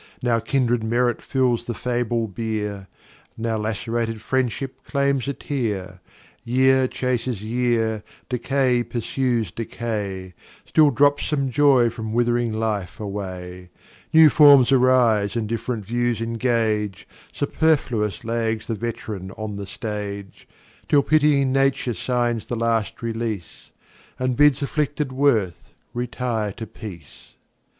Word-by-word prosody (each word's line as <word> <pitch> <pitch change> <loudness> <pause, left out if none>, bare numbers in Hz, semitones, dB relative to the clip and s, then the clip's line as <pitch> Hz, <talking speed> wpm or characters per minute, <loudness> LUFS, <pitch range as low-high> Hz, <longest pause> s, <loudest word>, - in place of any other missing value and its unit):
Now 120 -2 +2
Kindred 120 -1 0
Merit 120 +1 +1
fills 125 -3 0
the 120 - -4
fable 120 -2 -1
Bier, 105 -2 -4 0.5
Now 115 0 -1
lacerated 115 +1 -2
Friendship 130 +2 -2
claims 140 -2 0
a 140 - -1
Tear. 100 -11 -4 0.4
Year 130 +2 +3
chases 125 -4 -2
Year, 115 -2 0 0.2
Decay 125 0 +1
pursues 120 -3 -1
Decay, 105 -5 -4 0.3
Still 155 -2 +5
drops 145 +2 +2
some 140 -3 0
Joy 130 -4 +4
from 110 -1 -5
with'ring 120 0 +1
Life 110 -4 -2
away; 90 -3 -6 0.4
New 160 -1 +8
Forms 140 -4 +7
arise, 125 -6 +3
and 115 -2 -1
diff'rent 115 -1 -3
Views 120 +1 0
engage, 115 -4 -1 0.2
Superfluous 135 -9 0
lags 115 -1 -1
the 115 - -2
Vet'ran 105 -4 -5
on 110 -1 -5
the 100 -1 -6
Stage, 100 -3 -6 0.4
Till 145 -2 +4
pitying 145 -3 +3
Nature 135 -2 +1
signs 120 +2 -1
the 120 - -2
last 115 -1 -1
Release, 115 -5 -4 0.5
And 130 -1 -1
bids 145 0 +4
afflicted 150 -1 -1
Worth 115 -11 0 0.2
retire 120 -4 -2
to 115 - -7
Peace. 90 - -11
115 Hz, 120 wpm, -23 LUFS, 110-130 Hz, 0.5 s, New